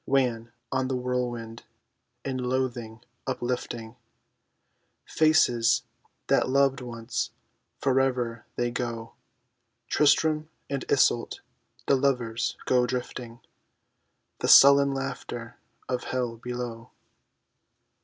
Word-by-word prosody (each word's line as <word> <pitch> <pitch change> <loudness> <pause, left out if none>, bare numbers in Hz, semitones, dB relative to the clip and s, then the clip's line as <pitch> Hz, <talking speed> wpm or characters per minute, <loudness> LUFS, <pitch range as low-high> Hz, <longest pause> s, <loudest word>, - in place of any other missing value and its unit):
Wan 120 -4 +1 0.2
on 130 -1 0
the 130 - -1
whirlwind, 120 -2 -3 0.6
in 130 -1 -2
loathing 125 -3 -2 0.3
uplifting 120 -3 -3 1.1
Faces 120 -8 +3 0.4
that 135 -1 +2
loved 135 0 +3
once, 115 -1 -4 0.5
forever 130 -4 0
they 120 0 -1
go, 115 -2 -4 0.8
TRISTAM 155 +1 +3 0.2
and 140 -2 -2
ISOLT, - - +2 0.4
the 140 - +4
lovers, 125 -4 0
go 125 -1 +3
drifting, 120 -1 -5 1.0
The - - -1
sullen 140 0 +8
laughter 135 -4 -5 0.3
of 125 -1 -2
Hell 125 -3 -2
below. 120 -1 -6
125 Hz, 90 wpm, -27 LUFS, 115-135 Hz, 1.1 s, sullen